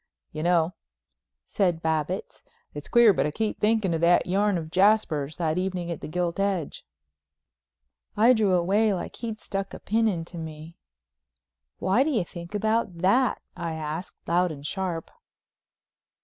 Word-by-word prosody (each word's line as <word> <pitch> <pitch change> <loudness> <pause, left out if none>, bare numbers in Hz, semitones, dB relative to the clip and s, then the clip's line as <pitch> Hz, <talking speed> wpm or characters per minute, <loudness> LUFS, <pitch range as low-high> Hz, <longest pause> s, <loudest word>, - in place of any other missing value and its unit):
"You 155 - -5
know," 170 0 +2 0.7
said 175 -4 0
Babbitts, 160 +3 -2 0.3
"it's 145 0 -7
queer 235 -3 +6
but 155 - +1
I - - -1
keep 215 +8 -2
thinking 210 -4 +2
of 165 - -1
that 175 +1 +4
yarn 200 +1 +1
of 160 -1 -6
Jasper's, 185 -7 +2
that 165 0 0
evening 180 -2 -3
in 170 - -4
the - - -7
Gilt 175 +2 -2
Edge." 195 -6 -1 1.3
I 230 +4 +6
drew 210 -5 +2
away 200 +4 +2
like 180 - -6
he'd 225 -2 -5
stuck 195 -2 -4
a - - -9
pin 225 +2 +1
into 175 -3 -3
me. 160 +1 -8 1.0
"Why 195 +7 +2
do 285 - +2
you 225 - 0
think 170 +3 -9
about 215 -3 0
that?" 220 +9 +2
I 165 -1 -4
asked 160 +2 -6
loud 175 +1 +2
and 145 -2 -9
sharp. 180 -1 -3
180 Hz, 155 wpm, -26 LUFS, 165-210 Hz, 1.3 s, queer